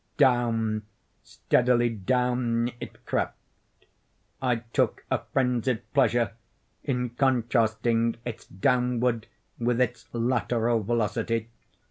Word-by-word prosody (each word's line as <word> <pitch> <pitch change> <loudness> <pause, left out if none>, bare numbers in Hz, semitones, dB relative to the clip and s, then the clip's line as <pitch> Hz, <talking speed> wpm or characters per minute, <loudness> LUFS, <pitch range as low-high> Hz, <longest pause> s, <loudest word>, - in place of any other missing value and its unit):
Down—steadily 120 0 +1
down 120 +2 0
it - - -10
crept. - - -1 1.0
I 125 -2 +2 0.2
took - - +1
a - - +2
frenzied 125 -2 +1
pleasure 120 -5 +3 0.5
in 125 -3 -1
contrasting 115 -2 +1
its 120 -3 -6
downward 125 +2 +1 0.3
with 120 0 +1
its 125 -1 -1
lateral 120 -1 +1
velocity. 115 +1 -1
120 Hz, 85 wpm, -27 LUFS, 115-125 Hz, 1.0 s, pleasure